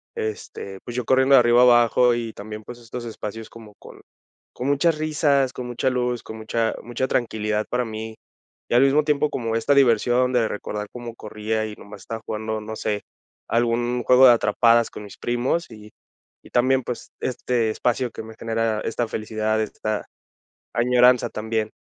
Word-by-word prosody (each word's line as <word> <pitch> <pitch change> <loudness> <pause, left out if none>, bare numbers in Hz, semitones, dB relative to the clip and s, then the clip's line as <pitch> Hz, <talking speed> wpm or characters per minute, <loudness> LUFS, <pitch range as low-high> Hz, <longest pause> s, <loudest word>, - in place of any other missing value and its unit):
este, 100 -2 -5
pues, 120 - -8
yo 125 -2 -2
corriendo 130 +1 +5
de - - +9
arriba 120 0 +5
a - - +7
abajo 120 0 +5
y 115 -2 -3
también, 105 +1 -8
pues, 120 +2 -10
estos 120 +1 -8
espacios 110 0 -7
como 110 -3 -13
con - - -14 0.5
con 125 - -4
muchas 150 +3 +2
risas, 150 -4 +1
con 125 -1 -6
mucha 125 +2 -1
luz, 125 -1 -1
con 110 - -8
mucha 110 +1 -1
mucha 120 +2 -3
tranquilidad 110 -4 -1
para 125 0 0
mí. 110 0 -6 0.5
Y - - -1
al 125 - +6
mismo 140 +2 +4
tiempo, 150 0 +1
como 115 -4 -2
esta 125 +5 +2
diversión 125 -1 +3
de 120 -3 +3
recordar 105 0 -5
cómo 120 -2 -8
corría 110 0 -3
y 105 - -8
nomás 100 -1 -12
estaba 115 +2 -6
jugando, 110 0 -3
no 110 +1 -7
sé, 105 -2 -2 0.4
algún 120 +1 0
juego 130 +3 +6
de 120 - +8
atrapadas 115 +1 +3
con - - -9
mis 100 - -12
primos 120 +8 -1
y 105 -1 -12 0.5
y - - -15
también, 130 +2 +2
pues, 120 0 -6
este 120 -2 -1
espacio 120 +1 -1
que - - -7
me 110 0 -11
genera 115 -1 -1
esta 115 +1 -2
felicidad, 110 0 -2
esta 110 0 -3 0.7
añoranza 125 +1 +4
también. 110 0 -2
115 Hz, 180 wpm, -23 LUFS, 110-125 Hz, 0.7 s, de